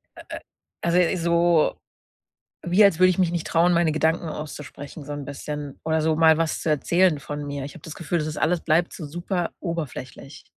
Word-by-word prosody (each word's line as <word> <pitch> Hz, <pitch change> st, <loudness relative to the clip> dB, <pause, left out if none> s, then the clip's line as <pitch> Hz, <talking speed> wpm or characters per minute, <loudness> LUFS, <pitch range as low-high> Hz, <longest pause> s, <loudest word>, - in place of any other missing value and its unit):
äh, -, -, -11 dB
äh, -, -, -5 dB, 0.4 s
also, 175 Hz, +2 st, +2 dB
so 170 Hz, -1 st, +2 dB, 0.9 s
wie 180 Hz, +5 st, +4 dB
als 195 Hz, -4 st, +4 dB
würde 185 Hz, 0 st, +6 dB
ich 180 Hz, -, 0 dB
mich 175 Hz, -2 st, +2 dB
nicht 170 Hz, -2 st, -3 dB
trauen, 170 Hz, +2 st, +3 dB
meine 170 Hz, -2 st, +3 dB
Gedanken 160 Hz, +2 st, 0 dB
auszusprechen 150 Hz, -1 st, -8 dB
so 145 Hz, -, -5 dB
'n 145 Hz, 0 st, -5 dB
bisschen 145 Hz, 0 st, -6 dB
oder 160 Hz, 0 st, +1 dB
so 155 Hz, 0 st, +1 dB
mal 160 Hz, -1 st, +5 dB
was 165 Hz, -1 st, -1 dB
zu -, -, -1 dB
erzählen 165 Hz, +2 st, +2 dB
von 145 Hz, +1 st, -6 dB
mir. 140 Hz, -1 st, -4 dB
Ich 145 Hz, -, -9 dB
habe 170 Hz, -, -14 dB
das 160 Hz, -, -8 dB
Gefühl, 175 Hz, 0 st, -2 dB
das 155 Hz, -, -2 dB
ist 155 Hz, -1 st, -5 dB
alles 165 Hz, +1 st, +1 dB
bleibt 170 Hz, +2 st, +1 dB
so 160 Hz, -, -7 dB
super 175 Hz, +3 st, -3 dB
oberflächlich. 155 Hz, -5 st, -6 dB
160 Hz, 205 wpm, -24 LUFS, 150-175 Hz, 0.9 s, würde